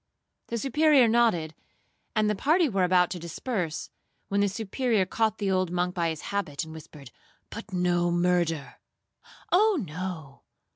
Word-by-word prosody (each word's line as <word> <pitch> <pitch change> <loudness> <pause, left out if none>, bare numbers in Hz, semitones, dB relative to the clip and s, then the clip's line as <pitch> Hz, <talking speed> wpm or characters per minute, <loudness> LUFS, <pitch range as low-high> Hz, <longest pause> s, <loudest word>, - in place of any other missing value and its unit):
The 235 - -3
Superior 275 +1 +4
nodded, 220 -9 +2 0.6
and 215 -1 +2
the 210 - +2
party 315 - +2
were 195 -7 0
about 180 -1 +3
to 180 - -4
disperse, 170 0 -4 0.4
when 200 0 +1
the 205 - +2
Superior 220 +1 0
caught 220 +3 0
the 200 -2 -1
old 185 -1 +1
monk 180 +1 -1
by 170 -2 0
his 160 -2 -5
habit, 155 -9 -2
and 160 0 -9
whispered, 150 -4 -12 0.4
'But 225 -1 -8
no 175 -1 +1
murder!'—'Oh 175 - -1
no! 160 -4 -6
185 Hz, 145 wpm, -27 LUFS, 170-225 Hz, 0.6 s, Superior